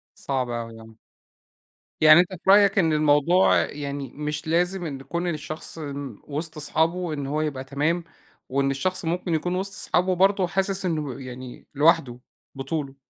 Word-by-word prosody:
صعب 130 -3 -2
أوي 115 -1 -5
آه. 110 0 -15 1.1
يعني 155 +2 +8
أنت 180 +1 0
في 185 +2 0
رأيك 200 0 +6
إن 165 -4 +3
الموضوع 150 +4 +4
يعني 140 -2 -5
مش 150 +1 -4
لازم 175 +2 0
إن 135 -3 -6
كُون 170 +6 -3
الشخص 155 +1 -5
م 140 -6 -6
وِسط 155 +2 -4
صحابه 165 +3 0
إن 140 -2 -4
هو 150 +2 -1
يبقى 140 -4 -3
تمام 150 +6 -1 0.4
وإن 135 +1 +1
الشخص 185 +6 -2
ممكن 170 0 -1
يكون 175 +3 -1
وِسط 195 +1 -2
صحابه 185 +1 +1
برضه 195 +1 +3
وحاسِس 195 +1 -1
إنه 150 -6 -3
يعني 130 -1 -9
لوحده 145 -5 +3 0.4
بطولُه؟ 135 0 -4
155 Hz, 155 wpm, -24 LUFS, 140-175 Hz, 1.1 s, يعني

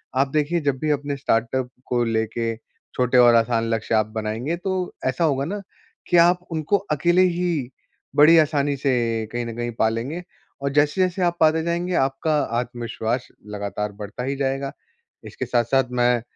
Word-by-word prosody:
आप 135 +2 +3
देखिए 155 +3 +1
जब 140 -2 0
भी 155 - -1
अपने 145 0 -1
स्टार्टअप 125 0 0 0.2
को 120 -1 +1
लेके 115 0 -1 0.4
छोटे 125 0 +2
और 120 -1 +7
आसान 115 0 +2
लक्ष्य 115 0 0
आप 110 -1 +3
बनाएँगे, 110 +9 -2
तो 185 0 -3
ऐसा 130 +6 0
होगा 140 -3 +1
ना, 200 +4 -4 0.5
कि 175 - +3
आप 175 +1 +5
उनको 160 +5 +1
अकेले 175 +5 +3
ही 175 -7 0 0.5
बड़ी 155 +3 +7
आसानी 145 -2 +2
से 120 -5 0
कहीं 120 0 -3
न 115 -1 -6
कहीं 120 0 -2
पा 110 - +4
लेंगे। 130 +11 -4 0.4
और 140 - 0
जैसे-जैसे 180 +6 +2
आप 175 0 +1
पाते 160 0 +4
जाएँगे 175 +2 -1
आपका 135 +4 +1 0.2
आत्मविश्वास 120 0 -3 0.3
लगातार 105 +1 -3
बढ़ता 105 +4 -6
ही 135 +2 -2
जाएगा, 135 0 -2 0.5
इसके - - -5
साथ-साथ 125 +2 +1
मैं 120 -1 +2
135 Hz, 165 wpm, -23 LUFS, 120-160 Hz, 0.5 s, और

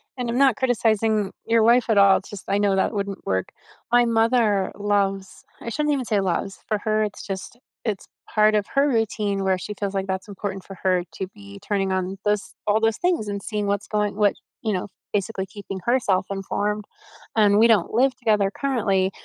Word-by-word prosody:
And 250 -2 -3
I'm 235 - -1
not 270 -3 +5
criticizing 220 -5 +1
your 230 -1 +3
wife 235 +1 +4
at 220 - +3
all, 200 -1 +7
it's 190 - -9
just 205 -2 -8
I 200 +1 +1
know 200 -1 +2
that 190 - +1
wouldn't 200 -1 -4
work. 95 0 0 0.4
My 240 0 +5
mother 225 -4 +2
loves 195 -2 -1 0.2
I - - -5
shouldn't 300 +4 0
even 265 -3 -1
say 210 -2 +1
loves, 195 +1 -2
for 215 - +1
her 215 0 +1
it's 210 - -5
just 195 +4 -6 0.3
it's 215 -4 -2 0.3
part 215 0 +4
of 205 -1 +1
her 280 +1 +4
routine 210 -4 0
where 190 -1 +2
she 210 +3 -6
feels 200 -1 -2
like 195 0 -2
that's 190 +1 -3
important 195 -1 -5
for 195 - -9
her 185 -2 +2
to 190 - -4
be 100 0 -12
turning 195 -2 0
on 190 +1 -2
those 210 -1 0
all 210 +1 +3
those 225 0 +1
things, 350 - 0
and 200 -1 -3
seeing 210 -1 -3
what's 200 -1 -1
going 210 -2 -1
what 210 -1 +3 0.3
you 215 -2 0
know, 185 +2 -2 0.3
basically 200 -1 -1
keeping 195 -1 -7
herself 235 -7 +2
informed, 205 +2 -2 0.5
and 210 -1 +5
we 230 - +7
don't 215 -7 +3
live 255 +3 +3
together 210 -5 +1
currently, 200 -9 +1
205 Hz, 205 wpm, -23 LUFS, 195-225 Hz, 0.5 s, all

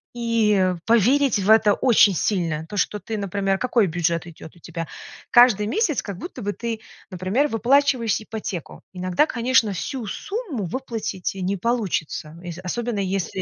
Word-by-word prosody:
и 210 -6 +2
поверить 240 +3 +3
в 195 +1 -1
это 220 -1 +6
очень 220 -5 +4
сильно. 165 -4 -1
То, 205 - -6
что, 210 +1 0
ты 220 +1 -5
например 195 -1 -1
Какой 235 -1 +2
бюджет 170 0 -1
идет 160 -1 -12
у - - -18
тебя? 165 0 -6 0.4
Каждый 240 -4 +6
месяц 310 - 0
как 200 -4 -7
будто 350 - -7
бы 205 +1 -2
ты, 230 -1 -4 0.3
например, 190 +10 0
выплачиваешь 245 -2 +2
ипотеку. 215 -6 -6
Иногда, 185 +8 +1
конечно, 245 -5 +2
всю 235 +6 -4
сумму 355 - -4
выплатить 225 -3 -4
и 195 - -7
не 190 +2 -1
получится, 185 -8 -2
ес 175 -1 -7
особенно, 230 +4 -2
если 190 -2 -2
210 Hz, 155 wpm, -23 LUFS, 185-240 Hz, 0.4 s, это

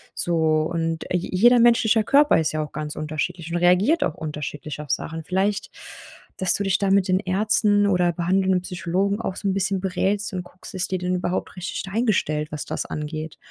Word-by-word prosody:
So 160 -2 +1
und, 165 -1 -2
äh, 180 - +3
je 175 - -5
jeder 240 +6 +6
menschlicher 230 -2 +4
Körper 285 - +4
ist 160 - 0
ja 155 0 -1
auch 150 - -9
ganz 150 +1 -5
unterschiedlich 155 +2 -4
und 175 - 0
reagiert 180 - +3
auch 160 - -1
unterschiedlich 150 -1 -6
auf 150 -2 -6
Sachen. 160 +3 -3
Vielleicht, 190 +4 -1 0.7
dass 185 -2 +2
du 200 - -1
dich 195 -1 +1
da 200 - +1
mit 195 -1 +3
den 185 0 +3
Ärzten 205 +2 +2
oder 180 -3 +2
behandelnden 185 +2 +1
Psychologen 185 +4 -1
auch 190 - -3
so 200 - -4
'n 195 - +1
bisschen 195 0 -1
berätst 195 +2 -1
und 180 -1 -3
guckst: 180 +1 -13
„ist 180 -1 -2
die 185 - +1
denn 180 +1 -1
überhaupt 180 0 -3
richtig 180 0 -4
eingestellt, 185 -9 0
was 150 -1 -5
das - - -3
angeht?“ 155 +1 -5
180 Hz, 200 wpm, -23 LUFS, 160-200 Hz, 0.7 s, jeder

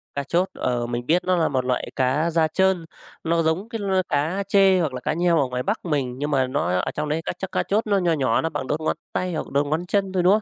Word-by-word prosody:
Cá 140 - -1
chốt, 175 +6 0
ờ, 120 -1 -1
mình 120 0 -3
biết 175 +5 +2
nó 185 0 +2
là 165 - +2
1 130 -2 -1
loại 125 -1 -1
cá 135 +6 +1
da 160 -1 +2
trơn, 190 +1 +1 0.4
nó 165 0 +1
giống 165 +7 -1
cái 225 -2 -4
l 200 -1 -2 0.2
cá 160 +7 0
trê 195 -2 +5
hoặc 155 -6 -1
là 125 - -4
cá 125 - -1
nheo 170 0 +2
ở 135 - +1
ngoài 125 0 -3
Bắc 210 -1 -2
mình 135 -6 -1
nhưng 145 +2 -2
mà 130 -2 +2
nó 130 -8 -1
ở - - -2
trong 150 0 -3
đấy 155 +2 0
các - - -3
chắc 190 - -5
cá - - 0
chốt 215 +2 0
nó 200 -1 +3
nho 175 -3 +2
nhỏ 130 -7 +1
nó 165 - -1
bằng 145 -4 -4
đốt 150 +3 -1
ngón 155 - -1 0.2
tay 180 -1 -1
hoặc 155 - -4
đốt 140 +1 +2
ngón 160 +4 -1
chân 195 +1 0
thôi, 180 -2 +1
đúng 185 +2 +6
không? 215 - +2
160 Hz, 295 wpm, -23 LUFS, 140-185 Hz, 0.4 s, đúng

